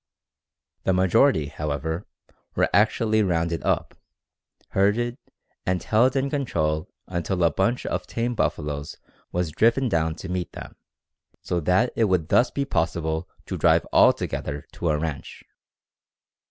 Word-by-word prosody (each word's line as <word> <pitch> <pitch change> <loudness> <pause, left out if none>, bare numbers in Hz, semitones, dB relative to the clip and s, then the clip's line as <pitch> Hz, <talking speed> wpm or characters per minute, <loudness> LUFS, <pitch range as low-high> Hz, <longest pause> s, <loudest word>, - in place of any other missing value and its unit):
The 95 - +2
majority, 95 - +3
however, 75 +4 -3 0.5
were - - +2
actually 110 +2 +3
"rounded 85 -3 0
up," - - 0 0.8
herded, 115 +6 +1 0.4
and 90 -1 -1
held 125 +5 +3
in 135 0 +1
control 80 - -1 0.2
until 90 0 -2
a 85 - +4
bunch 105 +10 0
of - - -3
tame 120 +1 -2
buffaloes 75 -9 -2 0.3
was 90 -2 -1
driven 115 - +2
down 80 -4 0
to 95 - -8
meet 90 -1 -3
them, - - -9 0.7
so 90 - -1
that 90 +9 +2
it 115 - +3
would 90 -5 0
thus 120 - +4
be 140 - -2
possible 80 - -1 0.2
to - - -4
drive - - +4
all - - +7
together 70 -1 -4
to 85 - -2
a 75 - +2
ranch. 75 -4 -5
90 Hz, 140 wpm, -24 LUFS, 80-115 Hz, 0.8 s, all